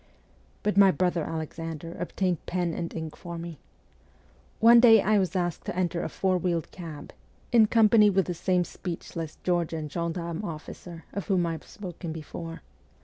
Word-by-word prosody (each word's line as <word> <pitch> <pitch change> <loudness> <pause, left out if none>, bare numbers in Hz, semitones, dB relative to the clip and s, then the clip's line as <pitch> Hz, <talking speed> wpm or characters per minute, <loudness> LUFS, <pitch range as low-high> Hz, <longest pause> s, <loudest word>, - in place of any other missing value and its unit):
But 210 -1 0
my 200 -1 +8
brother 180 -3 +1
Alexander 165 +1 -5
obtained 180 -1 -1
pen 175 -2 -1
and 170 0 -4
ink 160 -1 -5
for 170 -1 -7
me. 165 -3 -7 1.0
One 235 +1 +8
day 230 -2 +8
I 210 +1 +3
was 185 -1 -1
asked 175 -3 -1
to - - -4
enter 175 -2 0
a - - -3
four 185 -1 0
wheeled 170 -3 -1
cab, 160 -5 -9 0.4
in 230 -3 +6
company 215 -1 +6
with 195 -2 +2
the 180 - -2
same 180 +1 +1
speechless 165 -3 -6
Georgian 165 -3 -1
gendarme 170 +2 -3
officer 165 0 -8
of 200 - -4
whom 185 -4 +2
I 165 - -1
have 160 - -7
spoken 180 -4 -7
before. 165 +1 -7
175 Hz, 165 wpm, -27 LUFS, 165-190 Hz, 1.0 s, my